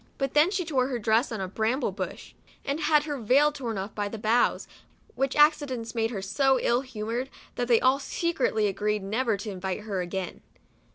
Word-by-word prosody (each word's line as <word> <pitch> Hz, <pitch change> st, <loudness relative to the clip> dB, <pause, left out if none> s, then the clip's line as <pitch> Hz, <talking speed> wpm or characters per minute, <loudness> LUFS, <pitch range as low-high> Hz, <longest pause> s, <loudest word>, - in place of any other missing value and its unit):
But 275 Hz, -2 st, -2 dB
then 300 Hz, +4 st, +5 dB
she 380 Hz, -3 st, -2 dB
tore 265 Hz, -5 st, +1 dB
her 260 Hz, -3 st, -2 dB
dress 230 Hz, +3 st, +2 dB
on 220 Hz, -3 st, -3 dB
a 190 Hz, -, -2 dB
bramble 220 Hz, +5 st, 0 dB
bush, 185 Hz, -2 st, -6 dB, 0.3 s
and 280 Hz, +2 st, -1 dB
had 300 Hz, -2 st, +3 dB
her 295 Hz, -2 st, -4 dB
veil 270 Hz, +7 st, +4 dB
torn 245 Hz, -7 st, -4 dB
off 195 Hz, +2 st, -5 dB
by 205 Hz, -1 st, -2 dB
the 225 Hz, -, -6 dB
boughs, 220 Hz, +3 st, +1 dB, 0.5 s
which 270 Hz, 0 st, -1 dB
accidents 290 Hz, -6 st, +2 dB
made 225 Hz, -1 st, 0 dB
her 200 Hz, -5 st, -5 dB
so 265 Hz, +6 st, +2 dB
ill 240 Hz, +1 st, +2 dB
humored, 240 Hz, 0 st, -4 dB, 0.2 s
that 245 Hz, -, -2 dB
they 235 Hz, -2 st, +5 dB
all 260 Hz, +2 st, +3 dB
secretly 285 Hz, -9 st, 0 dB
agreed 205 Hz, +1 st, -1 dB
never 220 Hz, +2 st, 0 dB
to 205 Hz, +1 st, -6 dB
invite 190 Hz, +1 st, -4 dB
her 205 Hz, -3 st, -3 dB
again. 180 Hz, 0 st, -5 dB
235 Hz, 195 wpm, -27 LUFS, 210-275 Hz, 0.5 s, then